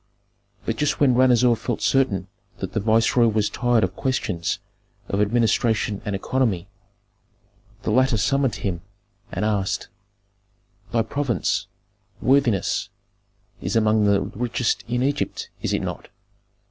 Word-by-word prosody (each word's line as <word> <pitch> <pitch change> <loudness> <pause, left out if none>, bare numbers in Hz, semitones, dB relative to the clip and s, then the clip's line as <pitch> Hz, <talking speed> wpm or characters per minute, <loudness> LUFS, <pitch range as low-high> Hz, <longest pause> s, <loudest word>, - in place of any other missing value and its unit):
But 115 - -1
just 150 -1 0
when 140 -4 +5
Ranuzer 125 -1 +4
felt 120 0 -3
certain 105 -9 +1 0.3
that - - -5
the - - +1
viceroy 115 +3 +3
was 110 -1 +1
tired 120 -2 +2
of 95 0 -1
questions 95 -11 -1 0.5
of 100 - 0
administration 110 -1 +1
and 105 -2 -2
economy, 100 -4 0 1.2
the - - -1
latter 130 +1 +3
summoned 135 +5 +1
him, 90 -4 -3 0.5
and 95 - -2
asked, 100 -3 -1 1.0
"Thy 115 -1 +2
province, 130 +1 -1 0.5
worthiness, 130 -10 +2 0.7
is - - -2
among 110 -1 +3
the 100 -1 +3
richest 120 +3 -1
in 120 +1 0
Egypt, 145 +2 -2
is - - -1
it - - 0
not?" - - -5
115 Hz, 125 wpm, -23 LUFS, 105-125 Hz, 1.2 s, when